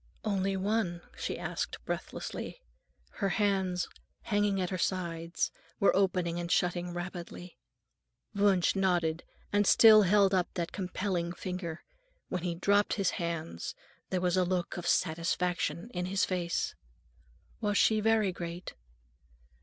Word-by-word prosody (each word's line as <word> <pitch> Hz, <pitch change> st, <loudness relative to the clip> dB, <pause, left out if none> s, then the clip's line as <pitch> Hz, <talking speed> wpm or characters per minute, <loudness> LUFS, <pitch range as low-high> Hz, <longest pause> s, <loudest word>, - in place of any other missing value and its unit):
"Only 195 Hz, -2 st, 0 dB
one?" 190 Hz, -3 st, -1 dB
she -, -, -3 dB
asked -, -, -3 dB
breathlessly; -, -, -5 dB, 0.5 s
her 200 Hz, -3 st, +1 dB
hands, 190 Hz, -3 st, +1 dB, 0.4 s
hanging 205 Hz, -2 st, +1 dB
at 180 Hz, 0 st, -1 dB
her 185 Hz, -, -1 dB
sides, 170 Hz, -2 st, -1 dB, 0.3 s
were 200 Hz, -, +4 dB
opening 180 Hz, -3 st, +1 dB
and 170 Hz, 0 st, -4 dB
shutting 175 Hz, 0 st, +1 dB
rapidly. 175 Hz, 0 st, -7 dB, 0.7 s
Wunsch 200 Hz, -3 st, +3 dB
nodded 175 Hz, -4 st, +1 dB, 0.3 s
and 205 Hz, -1 st, +3 dB
still 220 Hz, -2 st, +8 dB
held 200 Hz, 0 st, +4 dB
up 180 Hz, -2 st, +1 dB
that 170 Hz, -2 st, -2 dB
compelling 185 Hz, -2 st, -2 dB
finger. 180 Hz, -2 st, -5 dB, 0.5 s
When 180 Hz, -, -2 dB
he 175 Hz, -1 st, -2 dB
dropped 200 Hz, +4 st, +3 dB
his 195 Hz, -2 st, +1 dB
hands, 165 Hz, -, -4 dB, 0.3 s
there 185 Hz, -1 st, 0 dB
was 180 Hz, 0 st, +2 dB
a 185 Hz, -, +4 dB
look 180 Hz, -1 st, -1 dB
of 175 Hz, -1 st, -4 dB
satisfaction 170 Hz, +3 st, 0 dB
in 180 Hz, -1 st, -2 dB
his 190 Hz, +1 st, +1 dB
face. 175 Hz, -2 st, -1 dB, 0.9 s
"Was 205 Hz, -2 st, 0 dB
she 220 Hz, -1 st, +4 dB
very 215 Hz, -2 st, +3 dB
great?" 175 Hz, 0 st, -6 dB
180 Hz, 130 wpm, -31 LUFS, 175-200 Hz, 0.9 s, still